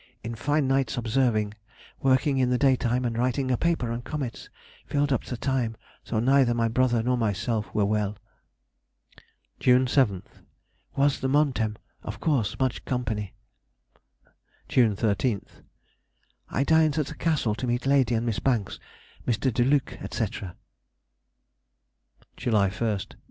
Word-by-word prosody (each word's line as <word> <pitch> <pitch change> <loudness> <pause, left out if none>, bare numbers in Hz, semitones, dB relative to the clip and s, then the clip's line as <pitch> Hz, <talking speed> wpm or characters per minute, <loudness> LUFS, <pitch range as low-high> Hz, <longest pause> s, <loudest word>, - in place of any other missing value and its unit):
In 115 - -4
fine 145 +5 0
nights 135 0 +1
observing; 115 -3 +1 0.5
working 135 +1 +2
in 125 -1 +2
the 125 - +2
daytime, 125 -2 +2
and 115 -1 -1
writing 130 +2 0
a - - +3
paper 165 -7 0
on 115 +1 -3
comets, 130 -2 -5 0.4
filled 145 -1 +1
up 125 - -1
the 125 - -5
time, 120 -4 -1 0.3
though 110 - 0
neither 130 0 +3
my 115 -1 +1
brother 120 0 +2
nor 125 +1 +1
myself 105 0 -1
were 105 -2 +3
well. 105 0 -1 1.4
June 125 +1 +4
7th.—Was 135 +3 -1
the 135 - -1
Montem, 130 -6 +1 0.3
of 105 - -7
course 130 - 0
much 130 -2 -1
company. 110 -6 -3 1.3
June 115 -5 +3
13th.—I 110 +5 -4
dined 160 0 +3
at 155 - +1
the 160 - -7
Castle 150 -11 0
to 110 +4 -4
meet 120 +2 -1
Lady 135 -4 +3
and 115 +1 -1
Miss 115 -3 -1
Banks, 120 -7 -1 0.5
Mr. 120 +2 +1
De 120 - +2
Luc, 135 +1 +1
&c. - - -2 2.1
_July 105 -5 +2
1st. 105 -4 -2
125 Hz, 135 wpm, -26 LUFS, 110-135 Hz, 2.1 s, June